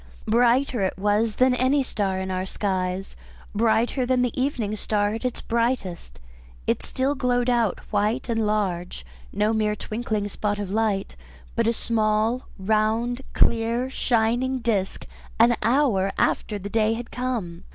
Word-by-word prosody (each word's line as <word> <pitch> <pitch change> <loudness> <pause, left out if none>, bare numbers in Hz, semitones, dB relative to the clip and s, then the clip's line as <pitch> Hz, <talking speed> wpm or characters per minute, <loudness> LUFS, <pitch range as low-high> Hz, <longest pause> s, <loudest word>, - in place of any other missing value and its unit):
Brighter 240 +1 +3
it 190 - -1
was 210 +2 +1
than 255 0 +4
any 260 +3 +2
star 195 -6 -1
in 190 0 -3
our 185 0 -2
skies; 190 -1 -2 0.4
brighter 230 +4 +2
than 250 0 +2
the 245 - -1
evening 235 -6 -1
star 205 -1 0
at 225 - -5
its 250 -1 -2
brightest. 230 - -2 0.5
It - - 0
still 265 +2 -1
glowed 250 -3 +1
out 235 -5 +1
white 215 +5 0
and 225 -2 0
large, 180 - -2 0.3
no 215 +1 +1
mere 215 -1 +1
twinkling 215 -1 -3
spot 205 0 -2
of 200 -2 -4
light, 210 -2 0 0.4
but 230 -1 +1
a 230 - +3
small, 220 +2 0
round, 220 +5 +1
clear 235 +3 +2
shining 245 +2 +1
disc, 220 -6 -1 0.3
an 235 +1 +6
hour 230 -7 +2
after 210 - 0
the 200 0 -6
day 220 +1 +2
had 235 +1 -6
come. 230 -10 -3
220 Hz, 150 wpm, -24 LUFS, 205-245 Hz, 0.5 s, an